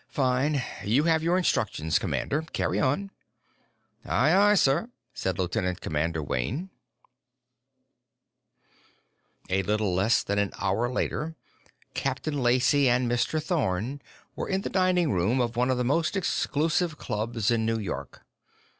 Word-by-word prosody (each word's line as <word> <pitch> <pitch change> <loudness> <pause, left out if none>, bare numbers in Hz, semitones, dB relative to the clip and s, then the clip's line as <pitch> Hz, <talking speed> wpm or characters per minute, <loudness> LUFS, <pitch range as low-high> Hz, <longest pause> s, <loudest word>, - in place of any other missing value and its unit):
"Fine. 135 +1 +1 0.2
You 120 +8 +2
have 160 -1 +3
your 170 +3 +2
instructions, 80 - +1
commander. 150 - -1
Carry - - 0
on." 170 +9 0 0.9
"Aye, 140 +8 +2
aye, 205 +1 +5
sir," 170 - +2 0.2
said 95 -2 -2
Lieutenant 90 0 -1
Commander 80 +1 -2
Wayne. 130 - -3 2.8
A 95 +1 +2
little 105 0 0
less 100 +6 +2
than 100 0 -1
an 100 -1 0
hour 100 +5 0
later, 150 +5 -2 0.6
Captain 140 +2 -2
Lacey 125 +3 +3
and 125 +1 +2
Mr. 120 +6 0
Thorn 140 - -1 0.3
were - - -4
in 190 0 0
the - - -5
dining 185 -4 +2
room 95 +8 +1
of 120 -2 0
one 125 +2 +1
of 130 - +1
the 125 - 0
most 155 +7 +1
exclusive 160 -2 0
clubs 110 -1 -2
in 115 -1 +1
New 115 0 0
York. 70 - -6
125 Hz, 135 wpm, -27 LUFS, 100-155 Hz, 2.8 s, aye